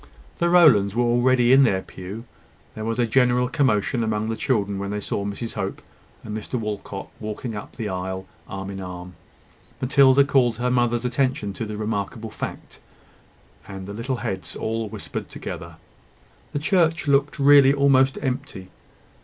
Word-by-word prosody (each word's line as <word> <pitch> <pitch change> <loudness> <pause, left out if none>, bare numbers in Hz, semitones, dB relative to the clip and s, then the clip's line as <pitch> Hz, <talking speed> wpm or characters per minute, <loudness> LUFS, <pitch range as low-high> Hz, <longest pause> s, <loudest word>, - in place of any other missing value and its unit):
The 170 - +2
Rowlands 125 - +5
were 120 - +2
already 120 +1 +3
in 135 - +7
their 95 -8 +2
pew. 100 +6 -9 0.5
There 110 - -6
was 115 +1 -2
a 120 - +2
general 125 +1 +3
commotion 125 -3 +1
among 110 0 -1
the 115 - -1
children 100 -5 -1
when 100 0 -4
they 105 +1 -2
saw 100 - -3
Mrs 100 +3 -5
Hope - - -4 0.4
and 105 - -6
Mr 110 +4 -5
Walcot 105 -2 -5
walking 110 +2 -5
up 105 - -8
the 115 -3 -4
aisle 95 0 -4 0.2
arm 95 -1 -6
in 95 0 -6
arm. 90 -1 -8 0.7
Matilda 135 +1 +5
called 130 -5 +2
her 125 +1 0
mother's 120 -1 +1
attention 125 -5 0
to 115 - -4
the 105 -1 -6
remarkable 110 +1 -3
fact, - - -7 0.9
and 95 -1 -7
the 100 - -7
little 115 +5 -3
heads 95 -1 -4
all 110 -1 -3
whispered - - -6
together. - - -7 0.8
The - - -1
church 165 0 +1
looked 140 +1 +2
really 140 -1 +7
almost 135 -1 +3
empty. 130 -8 -4
115 Hz, 160 wpm, -23 LUFS, 100-130 Hz, 0.9 s, in